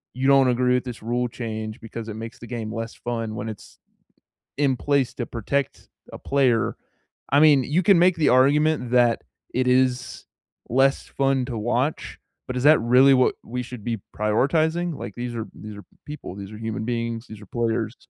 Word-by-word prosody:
you 130 +1 0
don't 135 -1 +6
agree 125 +1 +2
with 125 - 0
this 125 -3 -7
rule 120 +2 -1
change 110 -1 -6
because 115 0 -7
it 110 - -5
makes 115 +1 -8
the 120 - -10
game 115 -2 -5
less 115 0 -5
fun 115 -2 -4
when 110 +1 -4
it's 105 - -11 0.8
in 140 -2 +2
place 140 0 0
to 120 - -4
protect 130 +5 -3 0.2
a - - -8
player, 130 -5 +1 0.6
I 140 - +5
mean, 145 -4 +6
you 165 +8 +1
can 195 0 +6
make 180 0 +4
the 155 - +3
argument 140 0 +3
that 120 -2 +3 0.3
it 130 0 0
is 125 0 +1 0.4
less 135 +3 +2
fun 135 -2 0
to 115 - -4
watch, 125 +7 -2 0.3
but 125 0 -4
is 125 - -2
that 155 +1 +7
really 130 +3 +6
what 130 -1 +3
we 125 +2 -4
should 125 -3 -9
be 115 -3 -3 0.2
prioritizing? 155 +10 +1
Like, 100 - -7
these 120 -1 -5
are 110 -1 -4
these 105 -1 -9
are 105 - -10 0.2
people, 150 -10 -8
these 100 0 -8
are 105 - -9
human 110 -1 -4
beings, 115 -1 -3
these 110 -1 -11
are - - -11
players 115 +1 -2
125 Hz, 190 wpm, -23 LUFS, 115-135 Hz, 0.8 s, that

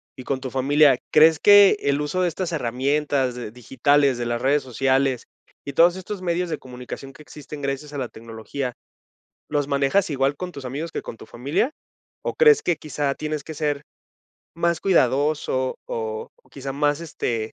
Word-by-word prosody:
y 130 - -9
con 135 0 -2
tu 130 - -5
familia. 140 0 +4
¿Crees 155 0 +6
que 205 0 +7
el 140 0 +1
uso 150 +5 -1
de 180 - +2
estas 180 +2 -4
herramientas, 135 -1 0
eh, 120 - -5
digitales, 135 +2 +1
de 120 - -2
las 120 0 -1
redes 140 +3 +2
sociales 130 0 0 0.4
y 140 - -5
todos 170 +3 +5
estos 190 +1 -6
medios 175 0 -1
de 155 - -3
comunicación 125 +2 -9
que 150 - -14
existen 150 0 -10
gracias 140 +2 -3
a - - -4
la 125 - -2
tecnología, 115 +3 -6 0.8
¿los 145 -2 0
manejas 140 +7 +2
igual 140 0 0
con 180 -1 -6
tus 140 - -8
amigos 145 +6 -4
que - - -3
con 115 - -9
tu - - -12
familia? 140 - -1 0.5
¿O - - -3
crees 450 -2 +6
que 175 -3 +1
quizá 145 -2 -2
tienes 155 -1 -4
que 160 - -8
ser 145 -1 -1 0.7
más 170 0 0
cuidadoso 140 -5 +1
o 110 -1 -4 0.2
quizá 135 -1 -6
más, 145 +2 +1
este, 115 -9 -3
140 Hz, 180 wpm, -23 LUFS, 130-155 Hz, 0.8 s, que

